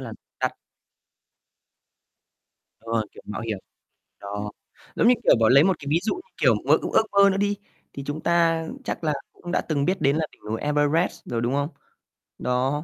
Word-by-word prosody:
là - - -7 0.3
đắt. - - +1 2.3
Đúng 115 - -11
rồi, 110 -2 0
kiểu - - -14
mạo 105 - -5
hiểm. 110 -3 -3 0.6
Đó, 105 +1 -5 0.4
giống - - +3
như 250 - +8
kiểu, - - +6
bảo 110 - +4
lấy 140 +3 +7
một 190 -1 +2
cái 140 - -9
ví 160 - +3
dụ 220 - 0
như 365 - -8 0.2
kiểu - - +5
mơ - - +6
ước - - -3
ước 220 - +5
mơ 200 0 +6
nữa 195 - 0
đi 205 0 +1 0.4
thì 140 - -6
chúng 145 +2 -4
ta 165 -1 +2 0.2
chắc 175 - -4
là 155 - +1 0.2
cũng 175 - -8
đã - - +2
từng 145 -3 -1
biết 185 +2 0
đến 140 +1 +3
là 160 0 0
đỉnh - - -23
núi 110 - -2
Everest 150 +3 +1
rồi, 115 -1 -2
đúng 120 +3 0
không? 145 +2 0 0.7
Đó. 130 +4 0
145 Hz, 200 wpm, -24 LUFS, 125-170 Hz, 2.3 s, như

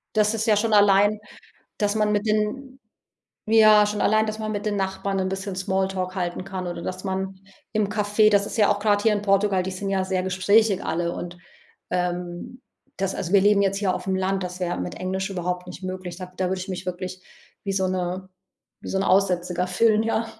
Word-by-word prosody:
Das 210 0 +3
ist 220 0 -2
ja 215 - +5
schon 220 +2 0
allein, 205 +1 +5 0.6
dass 205 0 +1
man 210 -1 +1
mit 210 +1 0
den 215 +6 -1 0.7
ja, 215 -1 +6
schon 210 0 -2
allein, 215 +1 +3
dass 215 0 -4
man 215 0 -3
mit 205 0 -4
den 205 -1 0
Nachbarn 195 0 -2
'n 190 0 0
bisschen 190 0 -4
Smalltalk 190 0 -1
halten 180 -1 -3
kann 190 -2 -5
oder 175 - -5
dass 185 0 -5
man 190 0 -3 0.4
im 215 -2 +1
Café 210 +1 +3
das 200 -1 +3
ist - - -6
ja 210 - +5
auch 205 - +1
grade 205 -1 +2
hier 220 0 +4
in 205 - -2
Portugal, 195 -1 +2
die 190 - -3
sind 195 +2 -4
ja 190 -1 +1
sehr 185 -1 -1
gesprächig 195 +2 +2
alle 170 +1 -1
und, 175 0 -6 0.5
ähm, 180 +5 -3 0.4
das 195 0 -1
also 180 +1 -4
wir 200 - +6
leben 205 0 +4
jetzt 195 0 +1
hier 195 -3 +1
auf'm 190 0 -2
Land, 190 0 0
das 180 0 -7
wäre 175 -1 -1
mit 90 - -5
Englisch 190 +1 -3
überhaupt 180 -1 -3
nicht 180 +1 -10
möglich 185 -2 -5
sage 180 0 -8
da 185 - -1
würde 190 0 -2
ich 185 - -7
mich 185 0 -5
wirklich 185 +1 -5 0.4
wie 195 - -1
so 190 -1 +1
'ne 185 0 -3 0.5
wie - - -8
so 190 - 0
'n - - +1
Aussätziger 180 -2 +1
fühlen, 215 +4 +3
ja. 225 0 0
195 Hz, 215 wpm, -24 LUFS, 185-210 Hz, 0.7 s, ja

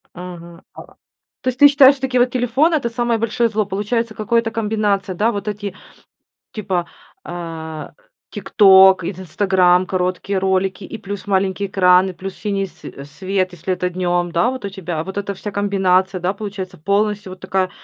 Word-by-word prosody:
Ага. 175 -1 -10
А. - - -10 0.6
То - - -8
есть 255 0 -1
ты 290 - +10
считаешь, 280 -1 +6
что 270 - -18
такие 260 -1 0
вот 245 0 +2
телефоны- 255 +7 +2
это 260 -6 -1
самое 240 0 0
большое 230 +1 0
зло, 215 -1 -1
получается, 210 +4 -2
какое-то, 230 +1 0
комбинация, 210 -4 -1
да, 215 +6 +1
вот 205 -1 -5
эти 205 -2 -4 0.8
типа, 190 -5 -2 0.4
э, 165 -3 -7 0.4
"ТикТок" 190 -3 +5
и - - -2
"Инстаграм", 185 0 +2
короткие 185 +1 -2
ролики, 190 +1 0
и 225 - -8
плюс 200 -1 -7
маленький 195 0 0
экран, 185 -1 +4
и - - -5
плюс 185 +2 -7
синий 200 -2 -2
све 140 -6 -11
свет, 185 +5 -2
если 180 +2 -3
это 180 0 -2
днем, 175 -1 -1
да. 170 +9 +2
Вот 260 -4 -7
у - - -2
тебя, 175 -5 -5
вот 190 +2 -6
эта 200 0 -3
вся 205 +2 -6
комбинация, 190 -2 +1
да, 180 +2 0
получается, 195 -3 -7
полностью 205 +3 -1
вот 185 - -12
такая 190 -1 -1
195 Hz, 175 wpm, -19 LUFS, 185-215 Hz, 0.8 s, ты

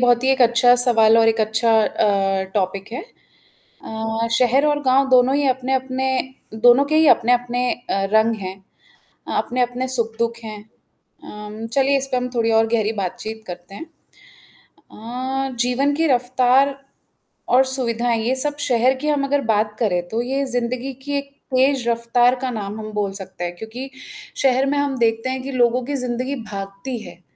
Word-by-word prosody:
बहुत 245 0 +3
ही 265 - +3
एक 260 - +2
अच्छा 245 +1 +5
सवाल 230 -2 +5
और 225 0 +5
एक 225 0 +1
अच्छा 220 +2 +1
अ, 195 -3 +1
टॉपिक 195 +1 -2
है 250 - -4 0.8
अ, 225 +1 -3
शहर 255 +3 +3
और 295 0 +1
गाँव 265 0 +3
दोनों 255 +1 +4
ही 285 -1 +1
अपने-अपने 260 0 -1 0.5
दोनों 245 +5 +5
के 310 +2 0
ही 315 0 +5
अपने-अपने 245 +1 +2
अ, 195 -5 -3
रंग 220 +1 +3
हैं 190 0 -6 0.7
अ, - - -5
अपने-अपने 245 +1 -1
सुख 230 -3 -1
दुख 235 0 -1
हैं 215 -2 -8 0.6
अम, 210 +1 -8
चलिए 275 0 +3
इस 270 0 -2
पे 255 - +1
हम 250 0 -2
थोड़ी 230 -1 +1
और 225 0 +3
गहरी 220 -2 0
बातचीत 220 +4 -6
करते 180 +2 -9
हैं 325 - -8 1.1
अ, 260 +4 -4
जीवन 250 +4 +1
की 325 +2 +1
रफ्तार 255 +1 +2 0.7
और 255 +2 +6
सुविधाएँ 240 -3 0
ये 255 +2 +1
सब 290 +2 0
शहर 245 +1 +3
की 290 +3 -5
हम 295 -2 +1
अगर 280 +1 0
बात 210 -1 0
करें, 185 -6 +1
तो 225 +4 -1
ये 270 +3 -2
ज़िंदगी 250 +1 -3
की 285 0 -2
एक 280 0 -6 0.2
तेज 260 -1 +2
रफ्तार 235 +1 +2
का 260 - -2
नाम 210 -2 -5
हम 215 0 -7
बोल 205 -2 -1
सकते 190 -2 -8
हैं 175 0 -4
क्योंकि 225 +7 -8 0.5
शहर 265 0 +3
में 285 +1 0
हम 285 -2 -1
देखते 225 +1 0
हैं 260 0 -3
कि 275 - -5
लोगों 245 -1 +2
की 285 +2 -3
ज़िंदगी 255 +1 -2
भागती 200 +4 -6
है। 175 - -13
245 Hz, 175 wpm, -20 LUFS, 220-260 Hz, 1.1 s, और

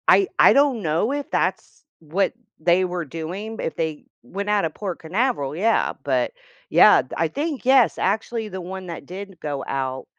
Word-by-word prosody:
I 390 - +6
I - - +8
don't 275 -5 +3
know 165 - 0
if 285 0 -3
that's - - -2 0.2
what 175 +7 -1 0.3
they 175 +3 +3
were 180 -2 -3
doing, 180 +9 -6
if - - -3
they 160 -2 -3 0.2
went 200 +11 -5
out 210 -3 +2
of 160 - -3
Port 190 -5 -5
Canaveral, 165 - -1
yeah, 220 +7 +2
but - - 0 0.4
yeah, - - +7 0.2
I - - +2
think, 290 -3 -4
yes, 260 -2 +5
actually, 220 +3 -1
the 190 -1 -6
one 190 +1 -7
that 170 - -7
did 195 +1 -8
go 145 -2 -3
out, 130 -1 -3
190 Hz, 175 wpm, -23 LUFS, 160-225 Hz, 0.4 s, I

